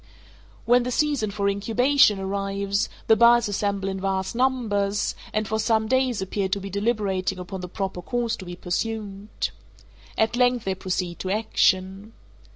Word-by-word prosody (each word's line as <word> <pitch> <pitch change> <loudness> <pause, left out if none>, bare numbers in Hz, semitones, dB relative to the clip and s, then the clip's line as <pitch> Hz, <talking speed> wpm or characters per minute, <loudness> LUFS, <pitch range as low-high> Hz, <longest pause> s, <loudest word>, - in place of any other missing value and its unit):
When 245 +1 +5
the 245 - -3
season 275 -4 +1
for 200 0 -1
incubation 225 +4 +3
arrives, 195 +1 -1 0.2
the 220 - +5
birds 235 +1 +5
assemble 200 -1 -1
in 190 -1 -3
vast 190 -1 -1
numbers, 220 -6 0 0.2
and 215 -1 -1
for 220 +2 -1
some 220 -1 +1
days 255 -4 +1
appear 190 0 -2
to 200 - 0
be 195 0 -7
deliberating 200 -3 -1
upon 185 +1 -6
the 180 - -6
proper 190 -1 -4
course 235 +4 -1
to 190 - -9
be 175 0 -7
pursued. 205 +2 -3 0.7
At 220 +2 +2
length 245 -1 +2
they 190 - 0
proceed 180 -2 -3
to 185 - -4
action. 195 -1 +1
200 Hz, 160 wpm, -24 LUFS, 190-230 Hz, 0.7 s, When